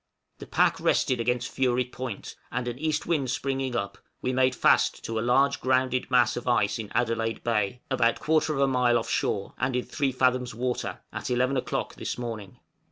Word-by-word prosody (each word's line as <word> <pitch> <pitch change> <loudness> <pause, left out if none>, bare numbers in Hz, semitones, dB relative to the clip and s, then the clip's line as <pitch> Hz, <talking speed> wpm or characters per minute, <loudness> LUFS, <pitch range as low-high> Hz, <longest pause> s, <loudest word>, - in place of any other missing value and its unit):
The - - -9
pack - - +2
rested 125 -2 +2
against 125 +1 -1
Fury 125 -1 +1
Point, 125 -3 -7 0.2
and 125 0 -2
an 120 +1 -4
east 155 0 -1
wind 150 -7 0
springing 135 0 -2
up, 100 -4 -3 0.2
we 130 - -1
made 130 0 +3
fast - - +3
to 115 -1 -2
a - - -1
large 130 +4 +2
grounded 130 -1 +1
mass 120 -2 +4
of 120 - -6
ice 115 -3 +2
in 105 -2 -6
Adelaide 115 -2 0
Bay, 115 0 0
about 120 -3 +2
1/4 155 -3 +2
mile 125 -2 +3
off 115 - -3
shore, 100 -1 -1
and 130 0 0
in 125 - -1
3 140 -3 -1
fathoms 125 -2 +1
water, 125 +1 -3
at - - -4
eleven 125 +2 +1
o'clock 130 - -2
this - - -4
morning. 115 -5 -6
125 Hz, 185 wpm, -27 LUFS, 120-130 Hz, 0.2 s, mass